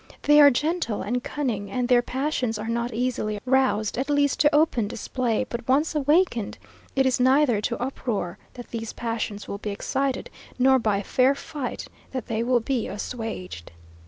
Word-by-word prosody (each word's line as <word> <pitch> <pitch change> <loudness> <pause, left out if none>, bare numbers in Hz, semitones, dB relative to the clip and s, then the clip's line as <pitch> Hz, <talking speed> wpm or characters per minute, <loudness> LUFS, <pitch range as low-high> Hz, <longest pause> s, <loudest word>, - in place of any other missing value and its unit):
They 295 0 +7
are 285 - +9
gentle 295 - -1
and 245 +4 -2
cunning, 230 -9 -3
and 250 -1 -1
their 245 -1 +5
passions 255 -3 -2
are 215 +1 -5
not 235 +1 -1
easily 225 -3 -2
roused, 250 -5 +1
at 275 +2 -2
least 285 -1 +2
to 295 -1 +4
open 295 -8 +3
display; 240 +1 -1
but 235 -1 -6
once 285 +6 +2
awakened, 295 - +1 0.4
it 270 0 +3
is 260 -1 +2
neither 260 -3 +4
to 235 +2 -2
uproar 240 -8 -3 0.2
that 245 -1 -10
these 225 -1 -5
passions 225 -3 -4
will 200 - -5
be 210 - -4
excited, 265 +6 -2 0.3
nor 265 +1 +5
by 210 -3 0
fair 260 +6 +3
fight 280 -2 -5 0.3
that 255 -4 -3
they 225 0 -2
will 240 0 +2
be 245 0 -1
assuaged. 205 - -6
245 Hz, 170 wpm, -25 LUFS, 225-270 Hz, 0.4 s, are